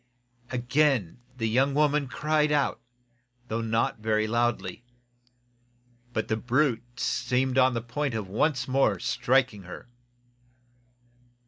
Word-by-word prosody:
Again 125 - +1 0.2
the 115 -2 -1
young 135 +5 +2
woman 150 -1 +2
cried 150 +2 +1
out, 145 -4 +1 0.7
though 115 +1 -1
not 115 0 0
very 110 0 +1
loudly. 120 +1 -1 1.3
But 110 -2 -2
the 110 - 0
brute 120 0 0
seemed 130 +1 0
on 130 -1 +4
the 115 - -2
point 125 +2 -2
of 105 -3 -3
once 125 +5 0
more 130 -6 +2
striking 125 0 +1
her. 90 +4 -10
125 Hz, 115 wpm, -27 LUFS, 110-135 Hz, 1.3 s, on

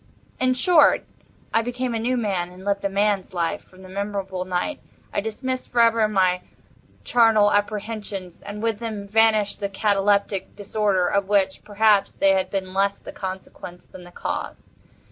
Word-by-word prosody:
In 255 0 +2
short, 315 +4 +4 0.5
I 225 - +4
became 245 +1 -3
a 225 - -1
new 250 +3 0
man, 195 -6 -1
and 185 +1 -13
lived 200 0 0
a 200 - +1
man's 200 -1 0
life. 175 +4 -1
From 185 0 -18
that 185 - -12
memorable 195 -1 -3
night, 185 +11 -2 0.3
I - - 0
dismissed 255 +4 -4
forever 230 -2 +4
my 185 -3 +2 0.6
charnel 225 -3 +4
apprehensions, 205 -3 -3
and 205 +1 -7
with 225 -2 0
them 215 -3 -5
vanished 215 -1 +3
the 200 -1 -2
cataleptic 200 -1 +1
disorder, 205 -2 0
of 200 -1 0
which, 195 -2 +1
perhaps, 205 -1 +3
they 195 - +3
had 190 -1 +1
been 190 -1 -3
less 200 +1 +1
the - - -10
consequence 185 -2 -8
than 185 - -13
the 175 - -12
cause. - - -5
205 Hz, 165 wpm, -23 LUFS, 190-220 Hz, 0.6 s, short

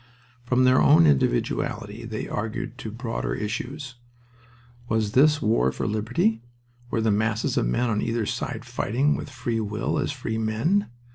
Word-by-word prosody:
From 125 +1 +3
their 130 0 +5
own 140 - +6
individuality 70 -4 0
they - - -4
argued 110 +3 -4
to 110 - -5
broader 115 +1 -3
issues. 125 +5 -5 0.9
Was 110 -2 +1
this 150 +5 +4
war 65 - +2
for - - -4
liberty? 110 +1 0 0.5
Were 115 - 0
the 110 -1 +2
masses 110 +2 0
of - - +1
men 120 - +1
on 105 -2 0
either 115 -1 -1
side - - -4
fighting 135 +8 0
with - - -6
free 120 -3 -2
will 105 0 -2
as - - -1
free 120 -5 -3
men? 115 - +1
115 Hz, 155 wpm, -25 LUFS, 110-125 Hz, 0.9 s, own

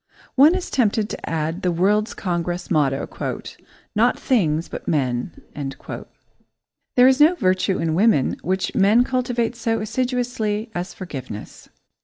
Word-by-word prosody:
One 295 +6 +6
is 370 - -4
tempted 220 -3 +1
to - - -6
add 165 +2 -2
the 180 - +1
World's 205 +5 +1
Congress 175 -1 -3
motto 140 -5 +1 0.9
"Not 235 +4 +3
things, 165 - +1
but - - -8
men." 125 -6 -1 1.6
There 250 0 +7
is 265 +1 +4
no 320 +4 +6
virtue 185 - +1
in 165 -1 -1
women 190 - +3
which 185 +2 -1
men 210 +5 +4
cultivate 245 -2 -1
so 225 -1 -1
assiduously 230 -2 -2
as 175 0 -4
forgiveness. 130 - -8
205 Hz, 130 wpm, -22 LUFS, 170-245 Hz, 1.6 s, There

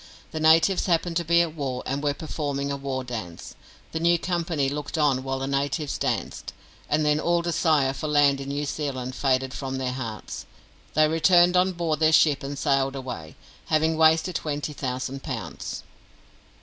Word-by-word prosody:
The 160 - -4
natives 160 +5 +4
happened 170 -1 +1
to 170 - 0
be 170 +1 +4
at 165 -2 -4
war, 135 -5 -3
and 135 +2 -2
were 145 -1 0
performing 140 -2 -3
a - - -1
war 135 -1 -3
dance. 110 -9 -7 0.4
The 160 - -3
new 170 +1 +3
company 170 -5 -1
looked 145 +3 -4
on 145 -4 +2
while 135 0 -3
the 135 - -3
natives 140 +2 -1
danced, - - -3 0.4
and 150 +1 +2
then 150 0 +3
all 170 +1 +1
desire 155 -5 +2
for 155 - -4
land 145 -2 +3
in 135 - -6
New 145 +1 -2
Zealand 135 -3 -3
faded 130 -1 0
from 135 0 -4
their 130 -1 -2
hearts. 115 -5 -6 0.5
They 155 0 +5
returned 175 +3 +4
on 185 +1 +3
board 165 -4 -1
their 155 0 +4
ship 150 -3 +4
and 140 +1 -5
sailed 135 -1 +1
away, 120 - -7 0.3
having 160 +1 +2
wasted 160 +3 +4
twenty 150 -2 -3
thousand 130 0 -4
pounds. - - -6
145 Hz, 175 wpm, -25 LUFS, 135-160 Hz, 0.5 s, They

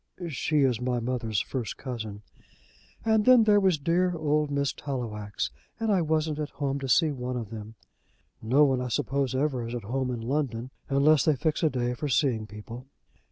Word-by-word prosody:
"She 150 +1 0
is 125 -3 +1
my 125 -1 0
mother's 115 -4 -1
first 125 -5 -4
cousin." 110 -6 -6 0.8
"And 220 -1 +3
then 255 -2 +7
there 210 -1 +5
was 190 -4 +3
dear 175 +4 +1
old 150 -1 +1
Miss 140 -1 0
Tallowax. 105 -7 -4 0.3
And 225 -1 0
I 190 -3 +3
wasn't 155 -1 0
at 150 -1 -2
home 140 -1 -2
to 135 -1 -5
see 155 +4 +4
one 125 -2 -4
of 115 -3 -6
them." 110 0 -8 0.7
"No 130 +7 +4
one 135 -3 +2
I 125 - -2
suppose 135 +1 -1
ever 135 -3 0
is 120 - -5
at 120 - -5
home 130 +4 -2
in 125 -2 -3
London 130 -1 -2 0.2
unless 140 +1 +4
they 155 - +3
fix 155 +3 -1
a 160 - +4
day 125 -2 -1
for 145 +5 -4
seeing 120 -5 +1
people." 115 +5 -9
135 Hz, 190 wpm, -27 LUFS, 120-150 Hz, 0.8 s, then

